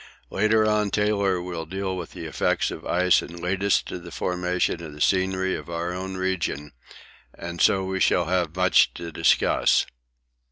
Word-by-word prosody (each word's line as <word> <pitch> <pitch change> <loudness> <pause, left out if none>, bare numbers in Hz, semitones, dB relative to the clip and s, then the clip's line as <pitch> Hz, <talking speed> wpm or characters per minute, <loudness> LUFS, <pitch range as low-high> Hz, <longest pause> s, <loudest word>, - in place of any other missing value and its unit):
Later 110 0 +2
on 105 -1 +1
Taylor 100 -3 +1
will 85 -3 -5
deal 95 +1 -3
with 90 -2 -7
the - - -7
effects - - 0
of - - -8
ice 90 +1 +3
and 85 0 -9
lead 95 +3 -2
us 100 - +3
to - - -7
the - - -11
formation 90 -1 -1
of 80 -3 -8
the 75 - -12
scenery 95 +2 +1
of - - -8
our 85 +1 -3
own 95 +1 -5
region, 85 -6 -2 0.6
and 85 -1 -6
so 95 0 +4
we 95 0 -3
shall 90 -1 +3
have 90 -1 -1
much 90 0 +3
to 85 -1 -7
discuss. - - +3
90 Hz, 175 wpm, -24 LUFS, 85-95 Hz, 0.6 s, so